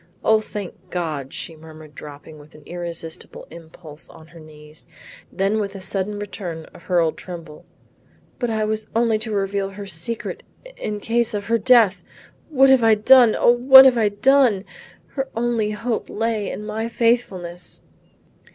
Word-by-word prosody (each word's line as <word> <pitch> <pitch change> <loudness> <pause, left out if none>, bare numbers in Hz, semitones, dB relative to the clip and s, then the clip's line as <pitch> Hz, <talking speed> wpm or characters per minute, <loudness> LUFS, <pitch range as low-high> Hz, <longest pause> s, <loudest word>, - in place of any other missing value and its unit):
"O 220 0 +4
thank 200 -3 -9
God," 155 -7 -4
she 165 - -7
murmured 155 -1 -14
dropping 150 +1 -11
with 150 +2 -17
an 150 - -16
irresistible 170 -2 -6
impulse 160 -2 -12
on 160 0 -16
her 170 - -15
knees. 150 -1 -11 0.4
Then 195 +3 0
with 200 -1 -4
a - - -7
sudden 195 +2 -2
return 185 -5 -7
of 180 - -15
her 180 -2 +1
old 165 -2 0
tremble, 165 -4 -10 0.7
"But 245 - -1
I 220 -1 -1
was 215 0 -2
only 230 -2 +2
to 220 0 -5
reveal 195 -1 -1
her 200 +1 -9
secret 195 +6 -3 0.4
in 210 -1 -5
case 230 0 0
of 205 -1 -4
her 230 +2 +1
death! 220 -3 +4 0.5
What 270 -3 +4
have 260 -3 +4
I 225 -1 +5
done, 240 +1 +6
O - - +4
what 265 +2 +8
have 250 -3 +4
I 215 -2 +3
done! 230 -2 +3 0.4
Her 270 -1 -4
only 230 -2 0
hope 225 +2 -3
lay 220 -2 -2
in 210 - -6
my 220 +2 -4
faithfulness." 195 -8 -2
205 Hz, 165 wpm, -21 LUFS, 170-230 Hz, 0.7 s, what